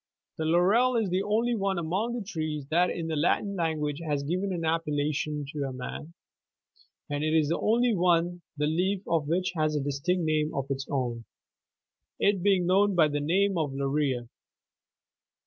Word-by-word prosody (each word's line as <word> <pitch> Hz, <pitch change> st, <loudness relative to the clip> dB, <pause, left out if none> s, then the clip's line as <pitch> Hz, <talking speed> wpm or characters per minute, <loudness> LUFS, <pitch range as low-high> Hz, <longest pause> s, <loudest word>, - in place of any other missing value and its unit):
91 -, -, -2 dB
The 160 Hz, 0 st, +1 dB
laurel 230 Hz, +8 st, +4 dB
is 220 Hz, -4 st, +1 dB
the 185 Hz, +1 st, +1 dB
only 225 Hz, +4 st, +1 dB
one 195 Hz, -3 st, 0 dB
among 190 Hz, +9 st, -1 dB
the 230 Hz, -4 st, -4 dB
trees 155 Hz, -7 st, -3 dB
that 175 Hz, +3 st, +3 dB
in 170 Hz, -, -3 dB
the 160 Hz, -1 st, -2 dB
Latin 185 Hz, +6 st, +1 dB
language 155 Hz, -4 st, -1 dB
has 145 Hz, -3 st, -1 dB
given 185 Hz, +6 st, -1 dB
an 170 Hz, -3 st, -2 dB
appellation 150 Hz, -2 st, -1 dB
to 145 Hz, -2 st, -2 dB
a 135 Hz, -, -4 dB
man,92 125 Hz, +3 st, -6 dB, 1.1 s
and 145 Hz, +1 st, -1 dB
it 155 Hz, +1 st, +1 dB
is 155 Hz, -2 st, +3 dB
the 170 Hz, -, 0 dB
only 235 Hz, +2 st, +2 dB
one 175 Hz, -1 st, +2 dB, 0.2 s
the 150 Hz, -, +1 dB
leaf 185 Hz, +5 st, 0 dB
of 160 Hz, -3 st, 0 dB
which 180 Hz, +3 st, 0 dB
has 155 Hz, -1 st, +1 dB
a -, -, +1 dB
distinct 145 Hz, +6 st, -1 dB
name 155 Hz, 0 st, 0 dB
of 135 Hz, 0 st, -3 dB
its 135 Hz, 0 st, -3 dB
own,— 120 Hz, -4 st, -2 dB, 0.9 s
it 200 Hz, -2 st, +2 dB
being 190 Hz, -2 st, +3 dB
known 195 Hz, +2 st, +3 dB
by 160 Hz, -3 st, +5 dB
the 145 Hz, 0 st, -1 dB
name 185 Hz, +5 st, +1 dB
of 145 Hz, -4 st, -2 dB
"laurea." 135 Hz, -3 st, -1 dB
165 Hz, 180 wpm, -28 LUFS, 150-190 Hz, 1.1 s, by